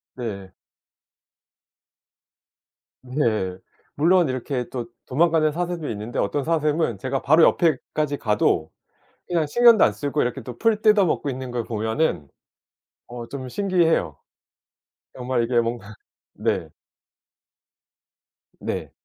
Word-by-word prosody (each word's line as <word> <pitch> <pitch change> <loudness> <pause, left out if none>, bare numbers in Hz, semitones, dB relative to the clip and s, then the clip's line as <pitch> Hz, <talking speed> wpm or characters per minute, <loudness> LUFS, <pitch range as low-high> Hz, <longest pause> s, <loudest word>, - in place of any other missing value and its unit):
네. 100 -7 -6 2.5
네. 115 -8 -1 0.4
물론 170 +2 +3
이렇게 130 -1 -3
또 120 -3 -4 0.2
도망가는 155 +2 +2
사슴도 175 -1 -3
있는데 110 +2 -5
어떤 145 -2 0
사슴은 155 - 0
제가 130 +4 -3
바로 155 +3 +5
옆에까지 150 -2 +1
가도 105 0 +1 0.6
그냥 170 -3 +1
신경도 235 +6 +6
안 - - +4
쓰고 145 +1 -2
이렇게 125 +2 -2
또 125 +2 -9
풀 220 -2 +1
뜯어 210 -3 +5
먹고 145 -3 -1
있는 130 -1 -5
걸 120 -1 -2
보면은 110 - -1 0.8
어 120 -1 -8
좀 130 -2 -6
신기해요. 170 - +1 1.0
정말 125 -1 -1
이게 120 0 +2
뭔가 115 -3 -5 0.4
네. - - -2 1.9
네. - - -4
135 Hz, 220 characters per minute, -23 LUFS, 120-165 Hz, 2.5 s, 신경도